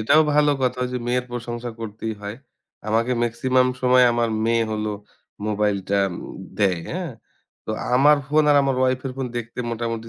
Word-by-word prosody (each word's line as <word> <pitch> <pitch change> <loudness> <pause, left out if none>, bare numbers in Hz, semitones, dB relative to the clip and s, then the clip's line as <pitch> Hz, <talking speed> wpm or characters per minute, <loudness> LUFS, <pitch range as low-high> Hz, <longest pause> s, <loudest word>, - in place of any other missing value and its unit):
এটাও 155 +8 +5
ভালো 150 0 +4
কথা 125 0 0
যে - - -1
মেয়ের 125 +1 0
প্রশংসা 120 0 -5
করতেই 110 0 -5
হয়। 100 +2 -5 0.5
আমাকে 115 +3 +1
মেক্সিমাম 125 +2 +2
সময় 125 0 +6
আমার 120 0 +1 0.2
মেয়ে 115 0 +2
হলো, 105 0 -2 0.5
মোবাইলটা 100 -2 0 0.2
উম - - -8 0.2
দেয়, 95 -5 +2
হ্যাঁ? 175 -5 -4 0.5
তো - - -3 0.2
আমার 145 +4 +6
ফোন 155 +1 +4
আর 145 - +5
আমার 135 -1 0
ওয়াইফ 130 0 +2
এর 130 - -4
ফোন 135 -1 -2
দেখতে 120 +1 -8
মোটামুটি 115 0 -3
120 Hz, 165 wpm, -23 LUFS, 110-130 Hz, 0.5 s, সময়